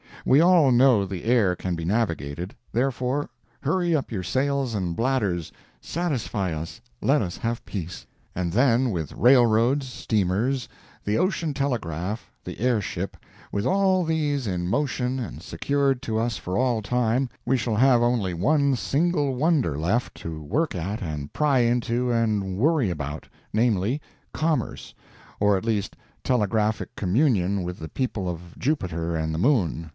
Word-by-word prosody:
We 135 - +5
all 170 -5 +5
know 120 -4 +5
the 95 -2 -6
air 110 -6 +3
can 90 0 -3
be 85 - -5
navigated—therefore, 115 - -2 0.3
hurry 170 +3 +1
up 140 - -2
your 100 -5 -2
sails 135 +2 0
and 90 -4 -2
bladders—satisfy 105 - -2
us—let 120 - -2
us 90 -2 -5
have 115 +1 -3
peace. 90 -4 -6 0.3
And 85 -1 -1
then, 125 +3 +3
with 80 -6 -3
railroads, 120 +2 +4
steamers, 115 +3 0 0.4
the 105 +1 0
ocean 170 -5 0
telegraph, 105 - -3
the - - -8
air 120 -2 +2
ship—with 100 +1 -6
all 190 +2 +3
these 150 -5 0
in 90 -3 -2
motion 125 +2 -1
and 115 -8 -6
secured 140 -2 0
to 110 -1 -1
us 115 -2 -1
for 90 - -4
all 120 -4 +1
time, 125 +3 +1 0.2
we 130 +2 +2
shall 115 -2 -1
have 125 +1 +5
only 115 -7 +1
one 140 - +2
single 145 +1 +1
wonder 140 - +2
left 95 +11 0
to 80 -1 -6
work 140 - -1
at 95 +6 -3
and 75 -5 -5
pry 145 -3 +2
into 120 +1 +1
and 105 -5 0
worry 140 - +2
about—namely, 100 - -2 0.3
commerce, 155 -1 -1 0.5
or 105 -1 +4
at 95 - -5
least 110 -4 -1 0.3
telegraphic 110 -3 0
communion 100 - +1
with 90 0 -5
the 80 - -7
people 105 - -2
of 85 0 -7
Jupiter 85 - -1
and 80 0 -1
the 80 - -2
Moon. 90 - +1
115 Hz, 140 wpm, -25 LUFS, 95-135 Hz, 0.5 s, We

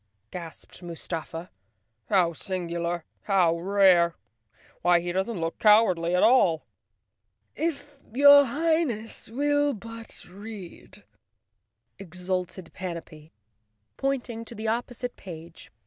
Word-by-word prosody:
gasped 170 0 -9
Mustafa. 165 0 -6 0.6
"How 180 -4 +3
singu¬ 175 0 -4
lar! 170 -1 -2 0.2
How 180 -5 +3
rare! 185 -2 +4 0.7
Why, 175 0 +4
he 175 +1 -3
doesn't 190 +3 -2
look 165 0 -3
cowardly 185 -6 +4
at 180 - +3
all." 185 -10 +4 0.9
"If 290 -3 -4
your 285 +3 +8
Highness 280 -7 -1
will 290 +3 +1
but 230 +2 -10
read," 200 -1 -11 1.0
exulted 180 -1 -4
Panapee, 165 -4 -8 0.7
pointing 245 -4 -2
to 235 - -10
the 220 +1 -4
opposite 245 +2 -3
page. 165 -2 -11
190 Hz, 100 wpm, -26 LUFS, 170-235 Hz, 1.0 s, your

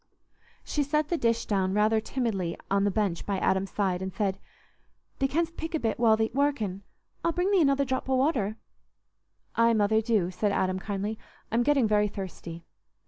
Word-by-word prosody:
She 295 - -1
set 300 +1 0
the 345 - +1
dish 230 -4 +1
down 190 -2 0
rather 215 +1 +3
timidly 215 -9 -2
on 200 0 +3
the - - +3
bench 195 -4 -1
by 200 -1 -2
Adam's 190 +1 +1
side 190 -3 -1
and 190 0 -3
said, 195 -2 -1 0.8
"Thee 270 - +2
canst 335 +4 -1
pick 325 0 -4
a - - 0
bit 225 -3 -1
while 225 -2 +5
thee't 220 +1 0
workin'. 250 -9 0 0.4
I'll 335 - +1
bring 360 +4 +1
thee 390 -3 +4
another 280 -2 +3
drop 260 0 -2
o' 265 - +3
water." 255 -6 +1 1.0
"Aye, 230 0 +4
Mother, 220 0 +3
do," 215 -6 +1
said 200 +3 0
Adam, 185 -1 0
kindly; 205 +2 -3 0.3
"I'm 230 +2 +2
getting 275 -2 +3
very 210 0 +3
thirsty." 175 -4 -7
220 Hz, 185 wpm, -28 LUFS, 195-270 Hz, 1.0 s, while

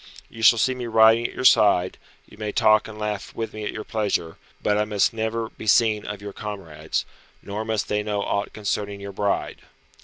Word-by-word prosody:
You 115 - -10
shall 115 +1 +7
see 130 +4 +2
me 125 -1 -5
riding 115 +1 +5
at - - -12
your 130 - -4
side; 95 -6 +4 0.3
you - - -17
may 105 -1 -4
talk 110 0 +4
and 110 -1 -10
laugh 105 -1 -4
with 115 -1 -4
me 110 0 -6
at - - -2
your 110 - -6
pleasure, 100 -8 -2 0.2
but 105 - +1
I 105 - +2
must 105 -1 +1
never 110 0 -2
be 110 - -11
seen 110 -1 +3
of 105 -1 -6
your 100 -1 -7
comrades, 95 -7 -5 0.4
nor 105 +2 -4
must 110 -1 -2
they 105 0 0
know 105 -1 -2
aught 100 0 -2
concerning 100 -1 -3
your 100 0 -7
bride. 100 +1 -2
105 Hz, 210 wpm, -24 LUFS, 100-110 Hz, 0.4 s, shall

